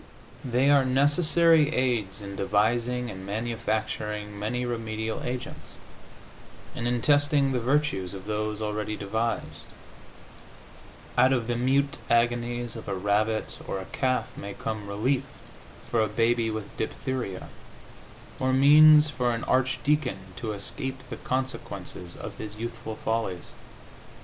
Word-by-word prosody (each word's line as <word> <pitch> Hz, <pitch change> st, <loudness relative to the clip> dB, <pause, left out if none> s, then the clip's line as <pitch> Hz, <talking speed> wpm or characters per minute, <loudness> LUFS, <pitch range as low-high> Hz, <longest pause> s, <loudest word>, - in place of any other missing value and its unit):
They 130 Hz, +3 st, +3 dB
are 140 Hz, -2 st, +6 dB
necessary 155 Hz, +4 st, +4 dB
aids 110 Hz, -6 st, 0 dB
in 100 Hz, 0 st, -6 dB
devising 115 Hz, +5 st, +1 dB
and 95 Hz, -1 st, -8 dB
manufacturing 110 Hz, -1 st, -3 dB
many 125 Hz, +4 st, -2 dB
remedial 110 Hz, -2 st, -3 dB
agents, 125 Hz, 0 st, -5 dB, 1.0 s
and 120 Hz, -, -2 dB
in 120 Hz, -1 st, 0 dB
testing 145 Hz, -1 st, +4 dB
the 130 Hz, -, 0 dB
virtues 120 Hz, -8 st, 0 dB
of 95 Hz, 0 st, -9 dB
those 105 Hz, 0 st, -2 dB
already 105 Hz, 0 st, -2 dB
devised; 110 Hz, +3 st, -3 dB, 1.5 s
out 130 Hz, -, +6 dB
of 125 Hz, -4 st, +1 dB
the 120 Hz, +1 st, -1 dB
mute 135 Hz, +3 st, +1 dB
agonies 120 Hz, 0 st, +1 dB
of 115 Hz, -, -8 dB
a 100 Hz, -, -1 dB
rabbit 105 Hz, +3 st, 0 dB
or -, -, -2 dB
a 95 Hz, -, -6 dB
calf 130 Hz, -2 st, -1 dB
may 100 Hz, 0 st, -7 dB
come 110 Hz, -2 st, -4 dB
relief 125 Hz, +7 st, 0 dB, 0.7 s
for 115 Hz, -, +3 dB
a 110 Hz, -, +2 dB
baby 115 Hz, +2 st, +1 dB
with 110 Hz, -2 st, -5 dB
diphtheria, 120 Hz, -4 st, -3 dB, 0.9 s
or 130 Hz, 0 st, +1 dB
means 150 Hz, +2 st, +7 dB
for 125 Hz, -3 st, 0 dB
an 115 Hz, -, -5 dB
archdeacon 130 Hz, -1 st, +1 dB, 0.2 s
to 110 Hz, -2 st, -3 dB
escape 130 Hz, +6 st, -4 dB
the -, -, -4 dB
consequences 100 Hz, -9 st, -4 dB
of -, -, -8 dB
his 105 Hz, -1 st, -6 dB
youthful 115 Hz, 0 st, -6 dB
follies. 110 Hz, -6 st, -3 dB
115 Hz, 130 wpm, -27 LUFS, 105-130 Hz, 1.5 s, means